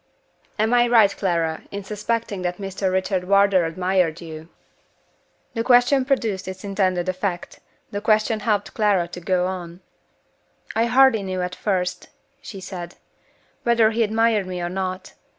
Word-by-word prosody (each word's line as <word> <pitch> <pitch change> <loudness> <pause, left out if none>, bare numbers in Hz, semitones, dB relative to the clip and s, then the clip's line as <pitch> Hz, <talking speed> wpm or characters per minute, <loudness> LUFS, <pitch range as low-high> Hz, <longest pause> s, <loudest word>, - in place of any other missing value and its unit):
"Am 220 +2 +1
I 240 0 +4
right, 225 -4 +5
Clara, 165 -4 -1
in 200 0 -6
suspecting 210 0 -3
that 180 0 -2
Mr. 195 -1 -2
Richard 185 0 -1
Wardour 200 -2 +4
admired 180 -1 0
you?" 160 -1 -9 1.0
The 230 - -1
question 245 +2 +4
produced 225 -8 -1
its 185 0 -7
intended 190 -3 0
effect. 185 -1 -3 0.3
The 205 - -4
question 215 0 +2
helped 210 -2 -1
Clara 205 -5 +2
to 175 - -8
go 180 0 +1
on. 180 -1 -6 0.9
"I 225 +1 +3
hardly 245 -2 +5
knew 185 -2 -3
at 180 0 -4
first," 185 -2 -2 0.3
she 195 - -9
said, 180 -2 -7 0.7
"whether 230 -2 +3
he 230 +1 -1
admired 220 -2 +2
me 180 -1 -4
or 175 0 -2
not. 185 0 -4
195 Hz, 150 wpm, -22 LUFS, 180-220 Hz, 1.0 s, right